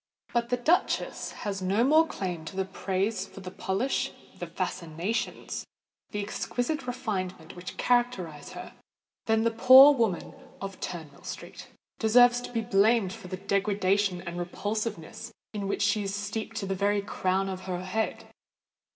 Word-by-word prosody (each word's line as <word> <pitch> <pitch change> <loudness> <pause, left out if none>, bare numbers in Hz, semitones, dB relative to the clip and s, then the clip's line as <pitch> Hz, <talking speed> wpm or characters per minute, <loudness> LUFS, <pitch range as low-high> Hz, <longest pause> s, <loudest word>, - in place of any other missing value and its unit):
But 235 0 +1
the 245 - +1
duchess 315 +9 +1
has 195 -2 -2
no 195 +5 +2
more 310 +5 +5
claim 180 - -4
to 190 +3 -2
praise 195 +3 -1
for 195 - -11
the 185 -1 -7
polish—the 210 +7 -3
fascinations—the 175 +4 -4
exquisite 245 +7 -2
refinement 190 -9 -4
which 180 +1 -8
characterise 195 -12 0
her, - - -8 0.5
than 220 0 +3
the 230 - +2
poor 260 +5 +9
woman 225 -9 0 0.3
of 195 -1 -6
Turnmill 155 -5 -7
Street - - -8 0.3
deserves 245 +2 +6
to - - -7
be 230 -2 0
blamed 215 -2 +3
for - - -10
the 185 0 -5
degradation 195 -1 +1
and 170 +1 -5
repulsiveness 210 +3 -4 0.2
in 200 -2 -3
which 200 - 0
she 210 +1 +2
is 195 0 -3
steeped 215 +2 -4
to 200 - -2
the 195 - -1
very 200 +1 +1
crown 190 -1 0
of 185 -1 -5
her 180 -1 -3
head. 220 +4 -2
200 Hz, 145 wpm, -28 LUFS, 185-230 Hz, 0.5 s, poor